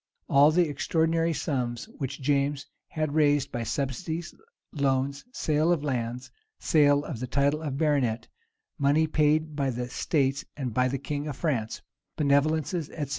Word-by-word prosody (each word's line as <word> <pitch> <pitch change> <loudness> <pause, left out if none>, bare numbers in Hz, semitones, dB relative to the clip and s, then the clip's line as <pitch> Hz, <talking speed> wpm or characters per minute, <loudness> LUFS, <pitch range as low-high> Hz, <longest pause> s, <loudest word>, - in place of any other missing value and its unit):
[*] - - -49
All 140 +2 +6
the 170 +2 +3
extraordinary 165 +2 +1
sums 125 -7 -2
which 135 -1 -4
James 140 0 +1 0.2
had 155 -2 -2
raised 145 -2 +2
by 120 - -3
subsidies, 145 +8 -3 0.4
loans, 140 -1 0
sale 155 -5 +1
of 165 -4 +1
lands, 125 -3 -3 0.3
sale 145 -3 +3
of 135 -8 -5
the 125 - -4
title 140 +4 +1
of 145 -4 -3
baronet, 140 -7 +1 0.5
money 145 +3 +3
paid 155 0 +1
by 140 -2 0
the 125 0 -3
states 135 -2 0
and 130 -5 -3
by 125 +2 +2
the 135 +2 -2
king 145 +2 -4
of 145 - -4
France, 125 -10 -2 0.3
benevolences, 155 +3 +1
etc. 145 -4 -5
145 Hz, 155 wpm, -27 LUFS, 135-155 Hz, 0.5 s, All